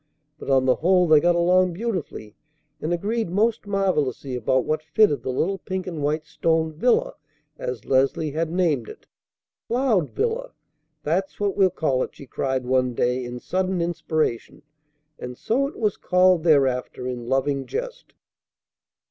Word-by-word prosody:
But - - -8
on 135 -1 +3
the 130 - +3
whole 180 +1 +3
they 155 -1 +7
got 175 +2 +3
along 180 +1 +3
beautifully, 180 - -5 0.5
and 155 - -2
agreed 210 +4 -1
most 215 +4 0
marvellously 155 - -1
about 130 +2 +1
what 155 0 -1
fitted 160 0 +2
the - - -5
little 185 +10 -1
pink 185 +1 -4
and 165 -5 -5
white 150 +2 -1
stone 160 0 0
"villa," 235 +11 +1 0.5
as 125 -3 -5
Leslie 135 +3 +1
had 160 +2 -1
named 165 -9 0
it. - - -12 0.6
"'Cloud 235 - +1
Villa,' 475 +3 -2 0.5
that's 180 +6 -1
what 205 -1 0
we'll 195 -2 +4
call 145 -7 0
it," - - -4
she 140 - -11
cried 130 0 -2
one 125 -1 +1
day 125 +2 0
in 120 0 -6
sudden 185 +5 -1
inspiration; 155 -7 -2 0.6
and 125 0 -7
so 270 +5 0
it 280 - -10
was 210 -4 0
called 180 -2 +3
thereafter 135 -6 +2
in 120 -2 -5
loving 135 +1 0
jest. - - -6
165 Hz, 155 wpm, -23 LUFS, 135-190 Hz, 0.6 s, they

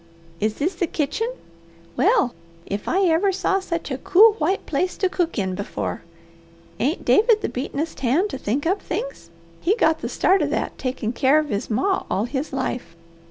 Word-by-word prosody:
Is 215 +1 0
this 335 +7 -1
the 350 0 -1
kitchen? 310 - -1 0.7
Well 385 - +3 0.3
if 200 +1 -4
I 380 +3 +2
ever 355 +4 +3
saw 385 +1 +1
sech 335 -5 -4
a 265 - -2
cool, 420 +8 +6
white 355 +6 0
place 360 +5 -1
to 380 - +2
cook 345 -5 -1
in 190 -3 -1
before! 200 +2 -4 0.8
Ain't - - -1
David 435 0 +4
the - - -1
beatenest 285 +5 -4
hand 290 - +1
to 270 - -5
think 270 +5 -1
up 380 +5 +1
things? - - -5 0.3
He 390 +5 +2
got 320 -8 +2
the - - -4
start 385 +1 +3
of - - +1
that - - -2
takin' 255 -3 -2
keer 275 +3 +4
of 305 -1 0
his 205 -3 -2
ma 380 - 0
all 205 - 0
his 265 +4 -3
life. 260 -8 -3
320 Hz, 185 wpm, -23 LUFS, 260-385 Hz, 0.8 s, cool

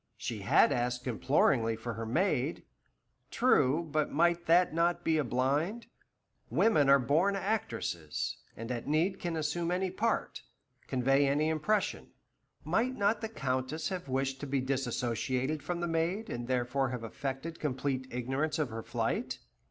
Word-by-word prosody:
She 115 -3 -4
had 100 +7 +4
asked 125 -1 -1
imploringly 120 -2 +2
for 115 +1 -5
her 115 +1 -5
maid. 150 - 0 0.7
True, 160 - +3
but 155 0 0
might 170 +2 +2
that 175 0 +4
not 170 +1 +1
be 160 -1 +2
a - - +2
blind? 140 - 0 0.6
Women 150 -11 +3
are 140 - +8
born 155 +10 +2
actresses, 115 - -2 0.2
and 115 +2 -5
at 120 -2 -4
need 165 +6 +1
can 170 -2 -3
assume 160 +2 -1
any 185 +1 0
part, 225 +5 -1 0.5
convey 135 +2 +3
any 150 +3 +2
impression. 160 +7 -1 0.5
Might 255 +3 +1
not 205 +3 +2
the 220 - -3
Countess 135 - -2
have 180 -6 -5
wished 135 0 -1
to 145 - -5
be 135 0 0
dissociated 130 +2 -1
from 175 +2 -3
the 175 - 0
maid, 170 +6 -1
and 120 0 -4
therefore 130 +1 0
have 125 -2 -5
affected 135 +7 -5
complete 130 -2 -2
ignorance 135 +6 -1
of 150 -5 0
her 115 0 -5
flight? - - -2
140 Hz, 150 wpm, -31 LUFS, 125-170 Hz, 0.7 s, are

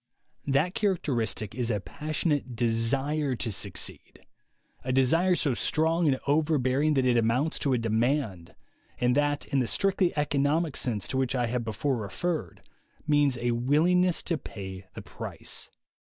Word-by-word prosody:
That 145 +6 +2
characteristic 130 - -1
is 120 0 -2
a 105 -3 0
passionate 150 - -2
desire 130 +5 +1
to 115 -1 -3
succeed, 95 -2 -5 0.6
a 130 - -2
desire 165 +8 +3
so 145 -6 +1
strong 160 +6 +1
and 130 -2 +2
overbearing 145 -1 +2
that 135 -1 +2
it 125 -1 +3
amounts 125 +7 +1
to 140 - +1
a - - +3
demand, 115 - -1 0.4
and 125 0 +2
that, 145 +1 +1
in 140 - 0
the 125 - +1
strictly 190 - +1
economic 145 +2 +1
sense 105 -8 -1
to 130 - -1
which 130 0 0
I 125 -1 +1
have 120 +1 -2
before 120 +5 -1
referred, 110 - -3 0.4
means 145 -4 +3
a 120 0 0
willingness 165 +9 +2
to 165 -4 -1
pay 95 -2 -8
the - - -7
price. - - -6
135 Hz, 150 wpm, -28 LUFS, 115-155 Hz, 0.6 s, desire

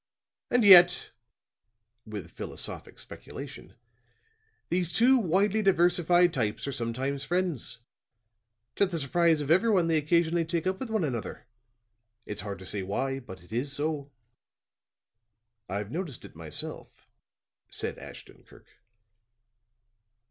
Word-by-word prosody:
And 245 -3 +3
yet," 180 -2 +8 1.0
with 100 -6 -7
philosophic - - -5
speculation, - - -10 0.9
"these 175 0 0
two 250 +8 +5
widely 200 +2 +2
diversified 175 -2 +3
types 115 0 -2
are - - -2
sometimes 135 +3 -3
friends. 175 -6 -2 1.0
To 200 - +4
the 175 -2 -3
surprise 160 +2 +2
of 145 +1 -2
everyone 190 0 +4
they 160 - +3
occasionally 170 +2 +2
take 165 +1 -2
up 190 0 -1
with 260 - -5
one 220 -4 0
another. 125 -4 -4 0.8
It's 105 -1 -5
hard 100 0 -6
to 95 - -11
say 100 +1 -1
why, 135 +8 -2
but 95 -9 -12
it 90 - -20
is 130 +4 -2
so." 145 -1 -3 1.6
"I've 100 +3 -4
noticed 160 -6 -5
it - - -14
myself," - - -6 0.6
said - - -3
Ashton - - -12
Kirk. - - -21
160 Hz, 120 wpm, -28 LUFS, 125-180 Hz, 1.6 s, yet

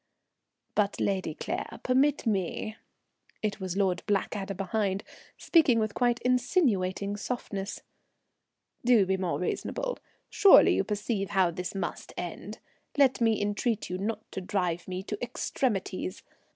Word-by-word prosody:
"But, 205 -1 +1
Lady 190 -6 -1
Claire, - - -4
permit 270 +3 +2
me," 215 +1 -1 0.7
it 210 0 -1
was 190 -1 -4
Lord 190 -3 +1
Blackadder 200 0 -1
behind, 195 +1 -1 0.3
speaking 300 -8 +4
with 215 -2 0
quite 245 -1 +2
insinuating 220 - +1
softness. 205 -3 -4 1.0
"Do 235 -5 +5
be 190 +1 +1
more 185 -2 -1
reasonable. - - -2 0.3
Surely 395 - +7
you - - +2
perceive 210 -1 -2
how 190 -3 +3
this 180 +3 -5
must 195 - -4
end? - - -6 0.4
Let 265 -3 +4
me 225 -2 +3
entreat 205 +1 -1
you 180 - -2
not 215 +3 -2
to 190 - -4
drive 180 -3 -1
me 185 0 -4
to 210 +1 -5
extremities. 200 -6 -2
205 Hz, 130 wpm, -29 LUFS, 190-235 Hz, 1.0 s, Surely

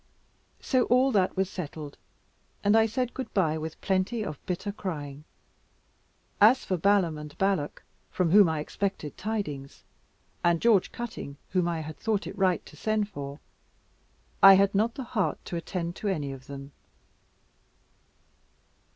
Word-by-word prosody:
So 255 -3 +2
all 255 +2 +4
that 190 -4 +1
was 190 0 +2
settled, 155 -5 -7 0.7
and 205 +2 +4
I 225 0 +5
said 250 +2 -2
good 260 - -5
bye 160 -5 +2
with 160 0 -6
plenty 195 +4 0
of 150 -3 -7
bitter 190 +2 -2
crying. 150 -8 -6 1.2
As 230 +6 +6
for 185 - 0
Balaam 180 -3 +2
and 150 -1 -10
Balak, 190 -7 0 0.3
from 180 -3 0
whom 200 -2 +7
I 160 -2 -1
expected 190 -2 -3
tidings, 170 -11 -4 0.6
and 170 -1 +3
George 220 -3 +3
Cutting, 220 -12 -6
whom 180 -2 +1
I 165 -2 -1
had 155 0 -8
thought 215 -2 -1
it - - -6
right 190 -3 +1
to - - -14
send 215 -1 0
for 140 -5 -7 1.0
I 195 0 +10
had 195 +1 +3
not 220 +4 +1
the 270 - -5
heart 225 -5 -1
to - - -5
attend 170 0 -3
to 210 - -4
any 150 -8 -1
of 130 -1 -10
them. 140 0 -8
185 Hz, 150 wpm, -28 LUFS, 155-210 Hz, 1.2 s, I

